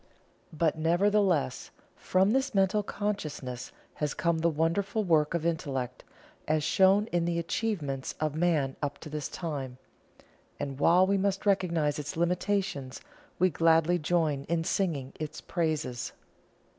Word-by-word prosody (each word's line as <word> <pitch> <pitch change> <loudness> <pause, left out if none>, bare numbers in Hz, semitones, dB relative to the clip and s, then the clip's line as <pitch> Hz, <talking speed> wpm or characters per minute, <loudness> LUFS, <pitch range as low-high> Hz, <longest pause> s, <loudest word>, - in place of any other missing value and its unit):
But, 160 0 0
nevertheless, 175 -4 +2 0.3
from 190 +2 +2
this 265 -2 0
Mental 195 +2 +3
Consciousness 155 - -4 0.2
has 150 -1 -2
come 170 -1 +1
the 170 +1 +3
wonderful 180 +7 0
work 160 -3 +2
of 165 -1 -2
Intellect, 135 -7 -2 0.4
as 155 0 +1
shown 195 +5 +4
in 175 -1 +1
the 170 0 0
achievements 165 - -2
of 155 -1 0
Man 155 -5 +1
up 145 -1 -2
to 155 - -9
this 150 -2 -3
time, 140 -7 -5 0.8
and 140 -1 -4
while 180 +5 +5
we 195 +1 +1
must 195 +1 -1
recognize 170 -7 +1
its 145 +2 -5
limitations, 175 -5 -1 0.4
we 185 +1 +3
gladly 165 +3 +3
join 155 -4 0
in 165 0 0
singing 155 -8 -1
its 155 0 -5
praises. 155 -7 -2
165 Hz, 135 wpm, -29 LUFS, 150-185 Hz, 0.8 s, while